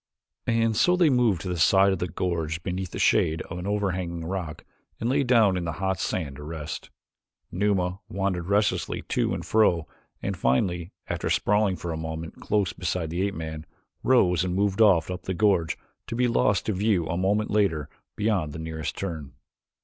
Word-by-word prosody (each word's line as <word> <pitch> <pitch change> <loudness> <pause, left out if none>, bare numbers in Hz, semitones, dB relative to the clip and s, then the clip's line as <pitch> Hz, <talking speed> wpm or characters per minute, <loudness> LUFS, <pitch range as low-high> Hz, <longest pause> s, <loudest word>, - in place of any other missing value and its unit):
And 115 -1 +2
so 180 +11 +4
they 175 -5 +4
moved 120 -9 +3
to - - -5
the 90 -2 -2
side 95 +4 +5
of 95 - -3
the 90 - -1
gorge 85 -1 -2
beneath 95 0 -3
the - - -7
shade 80 +1 +2
of 85 - -7
an 90 - -5
overhanging 90 -5 -2
rock 85 -4 -5 0.3
and 115 - -1
lay 140 +3 +2
down 115 -7 +4
in 90 - -2
the 85 - -2
hot 95 0 -1
sand 70 -7 -2
to 75 - -9
rest. 75 -1 -6 0.6
Numa 95 -1 0
wandered 95 -3 -2
restlessly 105 +1 +1
to - - +1
and - - -6
fro 90 -7 +3 0.3
and - - -3
finally, 85 +8 0 0.2
after - - -2
sprawling 105 -2 +2
for 85 -1 -5
a 80 - -3
moment 80 0 -6
close 105 -3 0
beside 90 -2 -2
the 85 +2 -1
ape 100 0 -1
man, 80 -1 -5 0.4
rose 90 -10 +4
and 90 -1 -2
moved 100 +2 +1
off 90 -5 +5
up 90 - -5
the 95 - -2
gorge 95 -5 +2 0.3
to - - -4
be 125 +1 +2
lost 105 -3 +2
to 110 - 0
view 100 -3 +1
a 80 - -2
moment 100 +4 +1
later 95 -9 +1 0.3
beyond 100 -9 0
the - - -6
nearest 80 -1 -5
turn. 80 -8 -5
90 Hz, 190 wpm, -26 LUFS, 80-105 Hz, 0.6 s, side